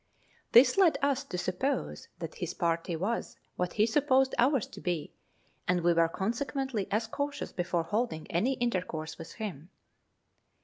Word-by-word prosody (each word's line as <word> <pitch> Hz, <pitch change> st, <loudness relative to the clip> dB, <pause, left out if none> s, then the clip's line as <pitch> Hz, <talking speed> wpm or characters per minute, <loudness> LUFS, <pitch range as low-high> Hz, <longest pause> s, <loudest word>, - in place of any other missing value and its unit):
This 255 Hz, +11 st, +7 dB
led 360 Hz, -5 st, +5 dB
us 280 Hz, -1 st, +2 dB
to 180 Hz, -, -5 dB
suppose 185 Hz, +11 st, -2 dB
that -, -, -6 dB
his -, -, -5 dB
party 170 Hz, -1 st, 0 dB
was 200 Hz, +8 st, -2 dB, 0.2 s
what 180 Hz, -1 st, -2 dB
he 215 Hz, -, +4 dB
supposed 265 Hz, +1 st, +3 dB
ours 260 Hz, -1 st, +3 dB
to -, -, -12 dB
be, 175 Hz, -4 st, -2 dB, 0.5 s
and 180 Hz, -1 st, +2 dB
we 170 Hz, 0 st, +4 dB
were 165 Hz, 0 st, +3 dB
consequently 235 Hz, -, -2 dB
as 215 Hz, +3 st, +1 dB
cautious 285 Hz, +5 st, -3 dB
before 175 Hz, -1 st, -1 dB
holding 170 Hz, -2 st, -1 dB
any 225 Hz, +11 st, +2 dB
intercourse 180 Hz, -11 st, -2 dB
with 165 Hz, -, -8 dB
him. 180 Hz, -8 st, -6 dB
210 Hz, 150 wpm, -30 LUFS, 175-265 Hz, 0.5 s, This